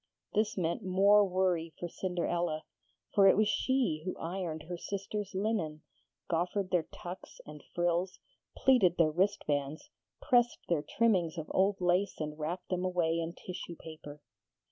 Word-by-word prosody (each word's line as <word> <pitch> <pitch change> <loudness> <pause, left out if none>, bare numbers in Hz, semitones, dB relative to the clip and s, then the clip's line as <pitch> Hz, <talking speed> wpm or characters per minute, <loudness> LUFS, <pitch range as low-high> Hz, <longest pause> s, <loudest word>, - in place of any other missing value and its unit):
This 215 0 +1
meant 170 +4 0
more 200 +3 +5
worry 180 -3 0
for 175 - -3
Cinderella, 175 -3 -2 0.5
for 200 -2 +6
it 195 - +6
was 215 0 +4
she 250 -10 +1
who 185 - -4
ironed 165 -2 -4
her 175 +2 -5
sisters' 200 +2 -5
linen, 190 -7 -1 0.4
goffered 180 +3 -1
their 175 -3 +1
tucks 180 +1 -9
and 150 -1 -11
frills, 175 +1 0 0.4
pleated 210 -10 +4
their 160 -2 +4
wristbands, 155 - -1 0.3
pressed 240 -1 +3
their 170 -4 +1
trimmings 185 -4 +1
of 155 -1 -5
old 195 +1 +2
lace 180 +2 +1
and 150 0 -4
wrapped 170 +4 -4
them 180 0 -1
away 175 -3 +1
in 165 0 -3
tissue 180 -1 -7
paper. 150 -3 -11
180 Hz, 145 wpm, -32 LUFS, 165-195 Hz, 0.5 s, for